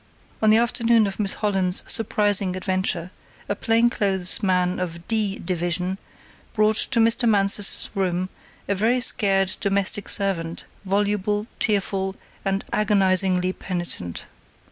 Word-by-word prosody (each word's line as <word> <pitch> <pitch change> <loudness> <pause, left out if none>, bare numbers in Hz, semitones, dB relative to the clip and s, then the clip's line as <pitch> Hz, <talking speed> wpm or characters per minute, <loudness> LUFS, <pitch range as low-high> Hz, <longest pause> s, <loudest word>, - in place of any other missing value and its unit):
On 220 - +3
the 215 - +6
afternoon 235 -1 +3
of 195 0 -5
Miss 200 -2 +1
Holland's 190 -3 0
surprising 205 -3 +1
adventure, 185 -2 -2 0.4
a 205 - -2
plainclothes 210 -5 +1
man 180 -2 0
of 170 -1 -6
"D" 215 -3 0
Division 180 +2 -2 0.5
brought 215 0 +2
to 230 - +2
Mr. 230 +1 +3
Mansus's 200 -1 +2
room 185 -2 -1 0.4
a 200 - +1
very 225 +6 +1
scared 195 -5 +2
domestic 200 0 0
servant, 175 -5 -2 0.2
voluble, 205 +1 0
tearful 195 -2 -1 0.3
and 195 0 -2
agonizingly 190 -3 +2
penitent. 175 - -4
195 Hz, 120 wpm, -22 LUFS, 185-210 Hz, 0.5 s, the